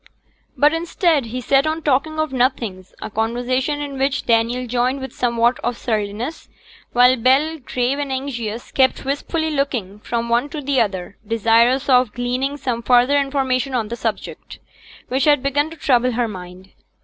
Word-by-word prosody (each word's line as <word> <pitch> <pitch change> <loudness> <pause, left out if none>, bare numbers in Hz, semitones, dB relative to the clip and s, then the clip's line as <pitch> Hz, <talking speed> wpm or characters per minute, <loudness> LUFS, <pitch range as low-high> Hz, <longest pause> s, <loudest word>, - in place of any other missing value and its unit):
But, 295 +2 +4
instead, 330 -4 +1
he 250 +3 -5
sat 275 +4 +2
on 315 +1 -2
talking 300 +3 +1
of 310 -3 -1
nothings, 235 -8 -1
a - - -6
conversation 245 +6 -1
in 280 -2 -5
which 270 0 0
Daniel 235 +2 +1
joined 250 +3 0
with 265 -2 -7
somewhat 235 0 +1
of 240 0 -2
surliness, 220 +6 -3 0.4
while 250 +1 +5
Bell, 275 +7 +2
grave 255 +1 -1
and 285 -2 -3
anxious, 240 -4 -4
kept 265 0 +2
wistfully 315 +3 -2
looking 245 -9 -2
from 235 +2 -3
one 240 +4 +1
to 305 - -5
the 275 -2 +1
other, 195 -3 -3
desirous 230 +4 +3
of 250 -4 +4
gleaning 250 +4 -2
some 250 -4 -3
further 250 +4 +4
information 270 -1 -1
on 225 -4 -1
the 235 - -3
subject, - - -5 0.5
which 260 +1 +1
had 290 -3 +4
begun 290 +2 +1
to 325 - -11
trouble 250 -3 +2
her 240 0 0
mind. 185 -1 -10
255 Hz, 165 wpm, -20 LUFS, 235-280 Hz, 0.5 s, while